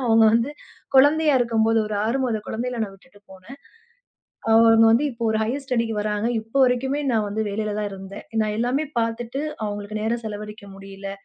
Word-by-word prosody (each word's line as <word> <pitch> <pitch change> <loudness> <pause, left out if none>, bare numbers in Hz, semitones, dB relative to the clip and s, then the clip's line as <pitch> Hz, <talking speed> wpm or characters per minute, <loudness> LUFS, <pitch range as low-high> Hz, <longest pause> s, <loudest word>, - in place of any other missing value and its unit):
அவங்க 225 0 +5
வந்து 235 +4 +2 0.4
குழந்தையா 295 +2 +5
இருக்கும்போது 225 -1 +2
ஒரு 210 - -4
6 235 +5 0
மாதம் 220 -4 -2
குழந்தையில 240 +1 -3
நான் 195 - -9
விட்டுட்டு 205 +2 -21
போனேன். 190 +9 -13 0.9
அ - - +1 0.2
அவங்க 225 0 +6
வந்து 235 +6 +3
இப்ப 235 0 -16
ஒரு 220 - 0
ஹையர் 265 +6 -3
ஸ்டடிக்கு 230 -4 -1
வராங்க. 210 +1 -1
இப்ப 225 +4 -22
வரைக்குமே 265 +3 0
நான் 215 -2 +1
வந்து 220 +2 -2
வேலையிலதான் 210 0 -2
இருந்தேன். 195 +1 -9 0.2
நான் 210 0 -2
எல்லாமே 260 +6 0
பாத்துட்டு 230 +4 -2 0.2
அவங்களுக்கு 205 +1 -5
நேரம் 230 +2 -1
செலவழிக்க 210 0 -7
முடியல. 195 0 -8
225 Hz, 170 wpm, -23 LUFS, 210-245 Hz, 0.9 s, அவங்க